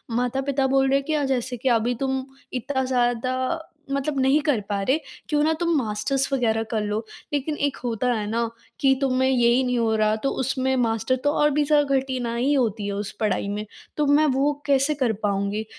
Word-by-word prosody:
माता-पिता 265 Hz, +3 st, 0 dB
बोल 270 Hz, 0 st, +3 dB
रहे 275 Hz, -, +3 dB
हैं 275 Hz, -, -2 dB
कि 310 Hz, -, -1 dB
अ, 295 Hz, -2 st, +1 dB
"जैसे 255 Hz, -2 st, -1 dB
कि 255 Hz, +3 st, 0 dB
अभी 240 Hz, +2 st, -1 dB
तुम 265 Hz, -1 st, -1 dB, 0.3 s
इतना 265 Hz, +1 st, -1 dB
ज़्यादा 255 Hz, +4 st, 0 dB, 0.3 s
मतलब 275 Hz, 0 st, -1 dB
नहीं 265 Hz, +3 st, +4 dB
कर 285 Hz, -8 st, +1 dB
पा 200 Hz, -1 st, -1 dB
रहे, 260 Hz, +9 st, +2 dB, 0.3 s
क्यों 295 Hz, -1 st, +2 dB
ना 315 Hz, -, +3 dB
तुम 340 Hz, -1 st, +1 dB
मास्टर्स 260 Hz, +4 st, -1 dB
वगैरह 225 Hz, -3 st, +1 dB
कर 220 Hz, -2 st, -1 dB
लो।" 210 Hz, +2 st, -2 dB, 0.3 s
लेकिन 295 Hz, +2 st, -1 dB
एक 280 Hz, -, -5 dB
होता 245 Hz, +1 st, 0 dB
है 215 Hz, -2 st, -2 dB
ना 230 Hz, +1 st, 0 dB, 0.3 s
कि 270 Hz, -1 st, +4 dB
तुम्हें 260 Hz, -1 st, +2 dB
यही 245 Hz, 0 st, +3 dB
नहीं 250 Hz, -1 st, 0 dB
हो 225 Hz, -1 st, +1 dB
रहा, 215 Hz, 0 st, +2 dB
तो 245 Hz, +5 st, -1 dB
उसमें 265 Hz, 0 st, 0 dB
मास्टर 225 Hz, 0 st, +1 dB
तो 290 Hz, -, +3 dB
और 295 Hz, 0 st, +3 dB
भी 295 Hz, +1 st, +2 dB
ज़्यादा 290 Hz, -2 st, +3 dB
कठिनाई 255 Hz, 0 st, -1 dB
होती 225 Hz, -6 st, 0 dB
है 200 Hz, -, -2 dB
उस 200 Hz, 0 st, -4 dB
पढ़ाई 215 Hz, -2 st, 0 dB
में, 210 Hz, +1 st, -3 dB, 0.3 s
तो 300 Hz, -, +2 dB
मैं 290 Hz, +2 st, +4 dB
वो 275 Hz, +2 st, +2 dB
कैसे 280 Hz, +1 st, +3 dB
कर 255 Hz, -6 st, +1 dB
पाऊँगी? 200 Hz, +1 st, 0 dB
260 Hz, 205 wpm, -24 LUFS, 225-275 Hz, 0.3 s, नहीं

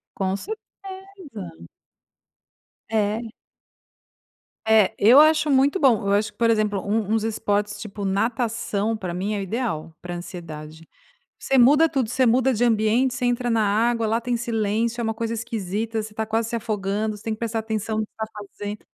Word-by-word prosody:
Com 190 Hz, 0 st, -1 dB
certeza. 380 Hz, -, -10 dB, 1.2 s
É. 215 Hz, +1 st, 0 dB, 1.4 s
É, 220 Hz, -3 st, +4 dB
eu 240 Hz, +7 st, +7 dB
acho 305 Hz, -1 st, +4 dB
muito 280 Hz, +6 st, +3 dB
bom, 235 Hz, -, +3 dB
eu 200 Hz, -, +2 dB
acho 210 Hz, +1 st, 0 dB
que, -, -, -39 dB
por 230 Hz, -, +3 dB
exemplo, 215 Hz, -3 st, +1 dB
um 210 Hz, +1 st, -1 dB
uns 225 Hz, -1 st, +2 dB
esportes 205 Hz, -1 st, -1 dB
tipo 205 Hz, 0 st, -7 dB
natação 225 Hz, +1 st, -1 dB
para 185 Hz, -5 st, -5 dB
mim 190 Hz, +4 st, -2 dB
é -, -, -2 dB
o -, -, -3 dB
ideal 190 Hz, -7 st, -3 dB
para 175 Hz, 0 st, -6 dB
ansiedade, 160 Hz, -3 st, -9 dB, 0.5 s
você 270 Hz, -, +1 dB
muda 285 Hz, +6 st, +6 dB
tudo, 265 Hz, -7 st, -1 dB
você 255 Hz, +2 st, +2 dB
muda 255 Hz, +3 st, +3 dB
de 225 Hz, -, -3 dB
ambiente, 230 Hz, +3 st, +2 dB
você 250 Hz, +1 st, -5 dB
entra 245 Hz, 0 st, +1 dB
na 230 Hz, -1 st, +2 dB
água, 230 Hz, +3 st, +1 dB
lá 225 Hz, +1 st, +1 dB
tem 240 Hz, +1 st, -2 dB
silêncio, 230 Hz, 0 st, -1 dB
é -, -, -1 dB
uma 225 Hz, 0 st, -1 dB
coisa 230 Hz, +1 st, -3 dB
esquisita, 220 Hz, 0 st, -3 dB
você 215 Hz, 0 st, -9 dB
tá 220 Hz, +1 st, -2 dB
quase 225 Hz, +1 st, -1 dB
se 235 Hz, -, -1 dB
afogando, 210 Hz, -1 st, -2 dB
você 210 Hz, -, -14 dB
tem 225 Hz, -, -2 dB
que 215 Hz, -, -8 dB
prestar 230 Hz, -1 st, -2 dB
atenção 220 Hz, 0 st, -2 dB
no 215 Hz, -, -1 dB
que -, -, -43 dB
você 220 Hz, -, -2 dB
está 220 Hz, -, -22 dB, 0.2 s
fazendo, 205 Hz, +1 st, -6 dB
220 Hz, 185 wpm, -23 LUFS, 205-240 Hz, 1.4 s, eu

